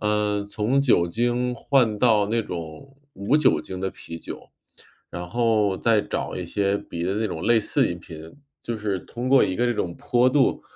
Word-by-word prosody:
呃， 105 -1 0
从 110 +6 0
酒 115 -10 +3
精 120 +4 0
换 120 -5 +1
到 110 -4 +4
那 115 +2 0
种 85 - -8 0.2
无 100 +9 +1
酒 150 -4 +3
精 95 -1 -7
的 95 - -2
啤 85 -1 -9
酒， - - -9 0.6
然 90 0 -6
后 110 -3 +1
再 115 -2 +3
找 - - -4
一 90 - -4
些 100 +2 0
别 85 0 -6
的 95 - -1
那 110 - 0
种 85 -4 -5
类 120 -1 +5
似 105 - +1
饮 85 - -5
品， 80 - -11 0.3
就 115 - -4
是 105 -3 -2
通 120 +8 -7
过 135 -1 +6
一 95 - -2
个 120 - +1
这 120 - +1
种 85 -4 -3
坡 125 +1 +2
度 135 -1 +2
105 Hz, 210 characters per minute, -24 LUFS, 95-120 Hz, 0.6 s, 过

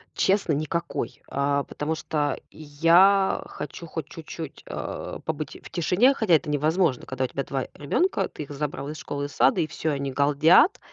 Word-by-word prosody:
Честно, 195 -4 +2
никакой. 155 +3 -3
А, 140 0 0
потому 155 +3 -3
что 145 -3 -1
я 170 +6 +4
хочу 165 +3 -8
хоть 160 -2 -5
чуть-чуть, 160 -1 -8
а, - - -5
побыть 155 -3 -5
в - - -11
тишине, 185 - +3
хотя 220 -10 +1
это 150 - 0
невозможно. 155 0 +1
Когда 130 0 -3
у - - +1
тебя 140 - -3
2 135 -1 -3
ребёнка, 335 - 0
ты 150 - -8
их 145 - -11
забрал 145 0 -4
из 155 - -6
школы 145 -1 -4
и - - -3
сада, 135 - +3
и 155 - 0
всё, 155 - -2
они 140 -1 -3
галдят. 150 - +4
155 Hz, 175 wpm, -25 LUFS, 140-170 Hz, -, я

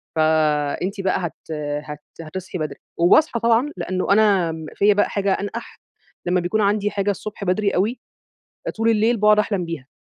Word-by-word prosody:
فأنتِ 155 +4 +1
بقى 190 -1 +1
هت 160 - -14 0.3
هت 150 -1 -7 0.2
هتصحي 185 +4 -6
بدري. 155 -4 -4 0.2
وباصحى 235 - +4
طبعًا، 235 +4 +2
لأنه 185 +1 -2
أنا 200 -5 +4
آمم 160 -1 -6
فيّا 205 +1 +4
بقى 205 - +2
حاجة 200 -1 0
أنقَح، 205 +5 -6 0.5
لمّا 180 +1 +2
بيكون 180 +5 0
عندي 205 0 +1
حاجة 205 0 0
الصبح 210 +1 -7
بدري 200 +2 +1
أوي، 215 +7 0 0.8
طول 225 +1 +2
الليل 225 +1 +3
باقعد 210 0 +5
أحلم 200 -4 0
بيها. 165 -5 -6
195 Hz, 160 wpm, -21 LUFS, 170-210 Hz, 0.8 s, باقعد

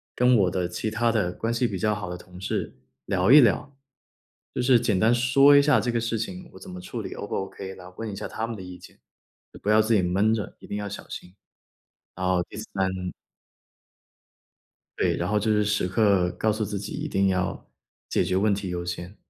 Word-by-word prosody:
跟 125 0 +4
我 95 -4 +3
的 90 -1 -1
其 105 +5 -3
他 115 +2 +1
的 100 -6 0
关 115 - -2
系 120 +1 +1
比 95 -4 -4
较 105 +2 +1
好 105 0 -5
的 - - -4
同 90 0 -13
事 95 - -3 0.3
聊 95 - +2
一 150 - +10
聊。 140 +3 +1 0.8
就 - - -1
是 125 0 +5
简 105 -5 +1
单 115 +5 +4
说 135 +4 +5
一 140 - +8
下 145 +1 +4
这 120 - -1
个 120 - +1
事 115 -1 -1
情， 180 +10 -6
我 - - -12
怎 195 - -11
么 180 0 -8
处 125 -11 -6
理 - - -6
O - - -6
不 - - -4
OK， 95 0 -5
来 90 -1 -12
问 115 -1 -4
一 - - -6
下 105 - -5
他 110 - -3
们 115 - -5
的 100 - -8
意 90 -1 -9
见。 - - -16 0.6
不 105 - -2
要 110 +1 +6
自 110 +1 +1
己 100 - +4
闷 95 +5 +2
着， 110 -2 -4
一 - - -13
定 - - -4
要 105 0 -4
小 100 - -8
心。 90 - -9 0.8
然 95 0 -2
后 90 -1 +2
第 - - -13
三 100 -3 -2 2.1
对。 - - +2
然 - - -2
后 105 0 +2
就 110 +2 -1
是 105 0 +3
时 105 -2 0
刻 100 -2 +3
告 110 - 0
诉 110 0 -1
自 105 0 -4
己 100 +2 -6
一 - - -4
定 95 0 +2
要 95 0 -2 0.4
解 - - +1
决 90 - -1
问 100 +2 +3
题 100 0 -3
优 90 0 -3
先。 90 +2 -6
105 Hz, 250 characters per minute, -25 LUFS, 95-115 Hz, 2.1 s, 一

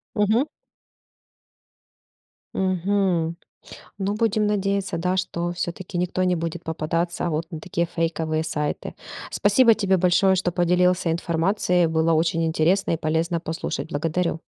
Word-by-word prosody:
Мгм. 215 +4 +3 2.1
Мгм. 185 -3 0 0.6
Ну, 195 +1 -1
будем 215 -1 +1
надеяться, 195 -3 -1
да, 180 +2 0
что 175 -2 -2
всё-таки 175 +1 -5
никто 180 +1 0
не 180 -1 +2
будет 170 0 -4
попадаться 165 +2 -2
вот 160 +1 -1
на 160 - -5
такие 170 +2 -1
фейковые 160 -1 -1
сайты. 150 -2 -3 0.4
Спасибо 225 +3 +4
тебе 195 -3 +2
большое, 185 +2 +4
что 180 -1 0
поделился 180 0 +2
информацией, 175 +1 +1
было 160 +1 +2
очень 165 +1 +1
интересно 165 +5 +2
и 165 - +1
полезно 165 +2 0
послушать. 165 0 -4
Благодарю! 165 +2 -1
175 Hz, 125 wpm, -23 LUFS, 165-190 Hz, 2.1 s, Спасибо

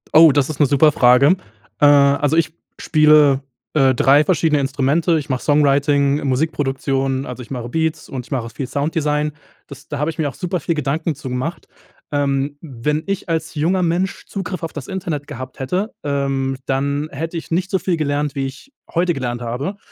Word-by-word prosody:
Oh, 160 -1 +9
das 145 0 +1
ist 155 - -6
'ne 145 - +5
super 145 +3 +4
Frage. 130 +7 +5 0.4
Äh, 145 - +5
also, 145 +2 +4
ich 160 -1 +1 0.3
spiele, 150 -3 +5 0.3
äh, 135 -4 +3
3 140 +5 +5
verschiedene 160 -3 +2
Instrumente. 145 +5 +1
Ich 150 - -4
mache 130 -1 -1
Songwriting, 145 -1 +2
Musikproduktion, 135 -1 -1
also, 125 0 -7
ich 115 - -11
mache 125 -3 -5
Beats 160 +2 -2
und 125 -3 -5
ich - - -25
mache 120 -4 -2
viel 130 +3 -5
Sounddesign. 150 +1 -1 0.4
Das 140 - -12
da 145 - -5
habe 150 +3 0
ich 155 - -15
mir 150 -2 +1
auch - - -11
super 180 -1 -2
viel 165 - -1
Gedanken 150 +2 -1
zu 135 -1 -7
gemacht. 130 +7 -4 0.4
Ähm, 140 0 0
wenn 150 +1 -2
ich 195 -2 -3
als 165 0 -2
junger 170 +5 +1
Mensch 175 +2 -1
Zugriff 190 -3 -5
auf 165 - -4
das 145 -4 -7
Internet 165 -6 -4
gehabt 130 -3 -8
hätte, 185 - -2
ähm, 135 -2 -1
dann 140 +3 -1
hätte 165 +5 -5
ich 165 - -7
nicht 180 +3 -1
so 190 - +2
viel 180 -2 -1
gelernt, 145 -1 -1
wie 135 -1 -1
ich 140 - -9 0.2
heute 175 0 +1
gelernt 120 -2 -3
habe. 130 - -4
145 Hz, 190 wpm, -19 LUFS, 135-160 Hz, 0.4 s, Oh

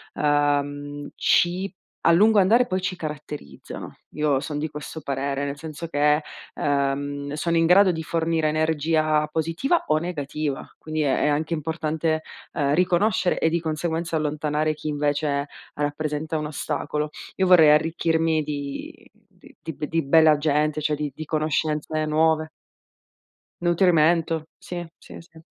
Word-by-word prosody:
uhm, 145 0 0
ci 185 +3 +2 0.3
a 170 - +5
lungo 210 +4 +5
andare 225 +6 +5
poi 185 -6 -1
ci 185 0 -2
caratterizzano. 150 -2 -8
Io 150 -3 +1
son 145 +1 -4
di 155 +2 -2
questo 150 +2 -8
parere, 140 0 -2
nel 140 0 -4
senso 160 +2 -7
che, 150 0 +2 0.3
uhm, 140 0 -1
sono 170 +3 0
in 165 - +4
grado 185 +3 +6
di 160 -2 -4
fornire 165 -1 0
energia 155 0 +1
positiva 165 - 0
o 155 - +3
negativa, 150 -3 -3
quindi 155 0 -3
è 140 -3 +1
è - - +3
anche 155 +3 0
importante, 160 0 -1 0.3
uhm, 140 -1 +1
riconoscere 180 +2 +2
e 160 - +3
di 170 +1 0
conseguenza 160 +1 -2
allontanare 150 0 0
chi 155 - -8
invece 145 -1 0 0.3
rappresenta 150 +1 -2
un 150 - -3
ostacolo. 150 0 -3 0.3
Io 190 - +1
vorrei 165 -4 +7
arricchirmi 160 0 +2
di 145 -2 -6 0.2
di - - -20
di 160 - -5
b 150 - -4
di 165 +2 0
bella 155 +1 +5
gente, 150 0 +1
cioè 150 0 0
di 150 -1 -3
di 155 - -6
conoscenze 155 0 -1
nuove. 155 +1 +2 1.1
Nutrimento, 165 -2 +3
sì, 175 -1 -6
sì, - - -12
sì. 165 -1 -16
155 Hz, 145 wpm, -24 LUFS, 145-165 Hz, 1.1 s, vorrei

